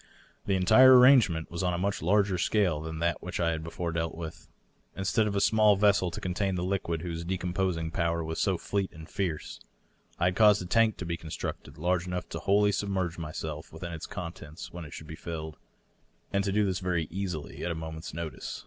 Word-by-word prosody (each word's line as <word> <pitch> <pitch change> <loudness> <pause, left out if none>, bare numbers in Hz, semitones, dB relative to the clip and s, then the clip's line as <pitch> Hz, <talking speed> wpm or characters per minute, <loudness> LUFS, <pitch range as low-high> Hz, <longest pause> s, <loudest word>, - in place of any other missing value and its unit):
The 100 - +2
entire 125 +8 +7
arrangement 125 - +5
was 85 - -3
on 90 -1 +1
a - - -2
much 100 +3 -1
larger 95 +1 +2
scale 90 -5 +1
than 80 0 -5
that 85 +1 0
which* 90 - -5
I 85 -1 +2
had 80 -1 -3
before 85 +1 -4
dealt 80 -1 -2
with. 80 -1 -8 0.5
Instead 105 +3 +1
of 100 - -2
a - - +2
small 105 0 +5
vessel 100 -2 +3
to - - -6
contain 95 +1 -1
the 90 - -2
liquid 90 -4 -2
whose 85 -1 -4
decomposing 90 -2 -1
power 85 0 0
was 80 0 -4
so 95 -3 +2
fleet 100 +2 -2
and 80 0 -11
fierce, 85 -6 -3 0.6
I 85 - +1
had 90 0 +2
caused 105 -1 +6
a - - -7
tank 110 +3 +3
to 90 - -5
be 85 0 -2
constructed 80 -1 -6
large 90 +2 0
enough 90 0 -3
to - - -5
wholly 100 +1 +3
submerge 95 -4 -2
myself 80 0 -5
within 85 +2 -7
ite 80 -2 -7
contents 85 -6 -7
when 85 -1 -7
it 75 - -11
should 80 - -8
be 80 - -8
filled, 80 -2 -6 0.8
and 100 0 +2
to 100 - 0
do 105 +1 +2
this 95 -2 -1
very 90 -4 -1
easily, 90 -4 -4
at - - -1
a 85 - -2
mo 80 0 -5
ment's 80 +1 -7
notice. 85 -1 -5
90 Hz, 215 wpm, -29 LUFS, 80-100 Hz, 0.8 s, entire